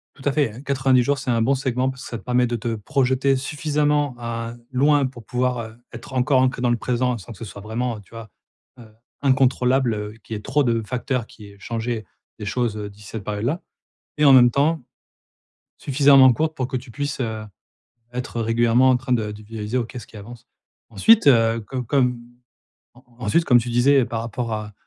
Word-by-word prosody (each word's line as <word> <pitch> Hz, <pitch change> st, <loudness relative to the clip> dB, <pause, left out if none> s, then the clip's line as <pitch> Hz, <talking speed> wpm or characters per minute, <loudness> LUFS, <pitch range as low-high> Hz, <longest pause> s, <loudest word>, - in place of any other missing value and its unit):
Tout 135 Hz, -, -15 dB
à 145 Hz, -, +3 dB
fait, 145 Hz, -6 st, +1 dB
hein, 120 Hz, +5 st, -11 dB
90 130 Hz, -2 st, +2 dB
jours, 140 Hz, +3 st, +1 dB
c'est 130 Hz, -, -5 dB
un 115 Hz, -, +1 dB
bon 135 Hz, +5 st, +2 dB
segment 130 Hz, 0 st, -1 dB
parce 130 Hz, -1 st, -8 dB
que -, -, -8 dB
ça 115 Hz, -, -4 dB
permet 125 Hz, +1 st, +1 dB
de 120 Hz, -, -2 dB
te 115 Hz, 0 st, -3 dB
projeter 130 Hz, +4 st, +1 dB
suffisamment, 145 Hz, 0 st, 0 dB
hein, 115 Hz, 0 st, -5 dB
loin 140 Hz, +2 st, +3 dB
pour 120 Hz, -4 st, -8 dB
pouvoir, 125 Hz, +1 st, -1 dB
heu, 110 Hz, -1 st, -8 dB, 0.2 s
être 120 Hz, +3 st, -10 dB
encore 130 Hz, +1 st, +3 dB
inclu 130 Hz, -1 st, 0 dB
dans 125 Hz, -, +2 dB
le 120 Hz, -, +1 dB
présent 125 Hz, 0 st, -1 dB
sans 100 Hz, +3 st, -11 dB
que 105 Hz, -, -10 dB
ce 115 Hz, -, -7 dB
soit 100 Hz, -1 st, -10 dB
vraiment, 115 Hz, +2 st, -3 dB
heu, -, -, -11 dB
tu 95 Hz, -, -24 dB
vois, 115 Hz, -2 st, -10 dB, 0.5 s
heu, 115 Hz, -, -13 dB, 0.3 s
incontrôlable, 130 Hz, -2 st, +2 dB
heu, 105 Hz, 0 st, -5 dB
qu'il -, -, -8 dB
y -, -, -3 dB
ait -, -, -9 dB
trop 140 Hz, +5 st, +1 dB
de 115 Hz, -3 st, +1 dB
facteurs 125 Hz, 0 st, -2 dB
qui 105 Hz, -2 st, -14 dB
aient 100 Hz, -, -19 dB
changé 115 Hz, 0 st, -4 dB, 0.3 s
les 105 Hz, -, -6 dB
choses, 115 Hz, +1 st, -1 dB
heu, 105 Hz, -1 st, -5 dB
d'ici 100 Hz, 0 st, -15 dB
cette 110 Hz, -1 st, -6 dB
période-là 110 Hz, -, -2 dB, 0.6 s
et 150 Hz, -, +3 dB
en 140 Hz, -, +8 dB
même 120 Hz, -2 st, +7 dB
temps, 150 Hz, +4 st, +1 dB, 1.0 s
suffisamment 135 Hz, -2 st, +6 dB
courte 155 Hz, +4 st, -1 dB
pour 130 Hz, -1 st, -2 dB
que 130 Hz, -, -2 dB
tu 125 Hz, 0 st, -11 dB
puisses, 145 Hz, +4 st, -4 dB
heu, 110 Hz, -3 st, -3 dB, 0.7 s
être 125 Hz, -1 st, -4 dB
régulièrement 120 Hz, +3 st, +3 dB
en 130 Hz, -, +4 dB
train 125 Hz, 0 st, -7 dB
de 110 Hz, -3 st, -1 dB
de 105 Hz, -, -10 dB
visualiser 110 Hz, +2 st, -4 dB
ou 120 Hz, -, 0 dB
qu'est-ce 120 Hz, -2 st, -9 dB
qui 110 Hz, -, -13 dB
avance. 115 Hz, +3 st, -12 dB, 0.4 s
Ensuite, 145 Hz, -, +4 dB
heu, 115 Hz, -3 st, +4 dB
com 125 Hz, +3 st, -5 dB
comme 125 Hz, -1 st, +1 dB, 0.8 s
en 125 Hz, -, -19 dB, 0.2 s
ensuite 165 Hz, +11 st, +2 dB
comme 125 Hz, -5 st, +5 dB
tu 120 Hz, +1 st, -3 dB
disais 130 Hz, +2 st, +4 dB
par 115 Hz, -1 st, -4 dB
rapport 115 Hz, 0 st, -4 dB
à 105 Hz, -1 st, -4 dB
125 Hz, 215 wpm, -22 LUFS, 115-130 Hz, 1.0 s, en